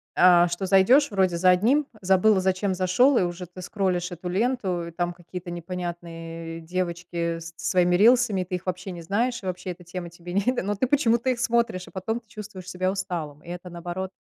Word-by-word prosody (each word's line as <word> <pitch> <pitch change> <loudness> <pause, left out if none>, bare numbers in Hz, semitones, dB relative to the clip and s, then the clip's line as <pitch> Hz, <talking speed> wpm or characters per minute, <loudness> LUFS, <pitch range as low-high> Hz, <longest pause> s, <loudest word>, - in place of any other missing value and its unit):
э, 175 -1 +6
что 175 +3 -3
зайдёшь 230 +9 +5
вроде 185 -3 +2
за 185 +1 +4
одним, 260 +11 +3
забыл, 190 +2 +4
зачем 190 +1 0
зашёл, 190 +9 +3
и - - +4
уже 175 +1 -4
ты 180 +1 -11
скроллишь 180 -2 -1
эту 175 +1 -7
ленту, 190 -5 0
и - - -8
там 175 +1 -2
какие-то 175 0 -8
непонятные 165 -1 -6
девочки 170 -1 -3
со 165 0 -9
своими 180 -1 +2
рилсами, 220 -2 +4
ты 180 +1 -4
их 180 - -6
вообще 185 +1 -4
не 175 -1 -7
знаешь, 235 +5 -1
и - - -8
вообще 180 0 -4
эта 175 +1 -11
тема 175 0 -6
тебе 175 +1 -10
не 200 +1 +2 0.2
но 205 +1 -1
ты 255 +5 0
почему-то 245 -3 +2
их 250 - 0
смотришь, 235 -5 0
а - - -13
потом 220 +5 -3
ты 230 - -34
чувствуешь 210 -4 -9
себя 185 +1 -1
усталым. 175 -6 -4
И 170 - -12
это, 180 +1 -7
наоборот, 175 +2 -5
185 Hz, 200 wpm, -25 LUFS, 175-200 Hz, 0.2 s, э